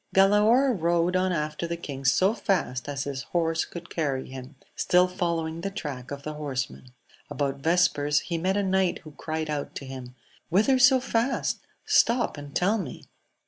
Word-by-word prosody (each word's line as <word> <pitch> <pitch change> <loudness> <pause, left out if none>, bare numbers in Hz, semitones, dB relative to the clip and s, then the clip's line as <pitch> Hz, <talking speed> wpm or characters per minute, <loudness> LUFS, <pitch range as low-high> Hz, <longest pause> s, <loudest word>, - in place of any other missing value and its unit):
ALAOR 215 +7 +5
rode 170 -1 +1
on 185 0 +2
after 155 0 -2
the 170 0 -3
king 140 -5 -7
so 190 +10 +4
fast 145 - -1
as 140 -1 -2
his 140 -1 -4 0.2
horse 165 -1 +1
could 170 0 -10
carry 140 -5 -1
him; 130 0 -9 0.2
still 180 0 +4
following 170 -2 -2
the 195 - -2
track 140 -10 -6
of 140 -1 -6
the 155 - -4
horsemen. 135 -3 -4 0.4
About 140 -1 -2
vespers 150 -2 +2
he 170 -2 -3
met 190 +4 +1
a 205 - +1
knight 190 -1 +1
who 155 - -11
cried 155 +1 -4
out 150 -2 -4
to 140 - -6
him, 130 -2 -8 0.3
Whither 215 +9 +3
so 260 +1 +7
fast? 245 0 0 0.3
stop 240 +1 +3
and 145 -1 -10
tell 205 +5 +2
me 155 -10 -7
165 Hz, 175 wpm, -26 LUFS, 145-190 Hz, 0.4 s, so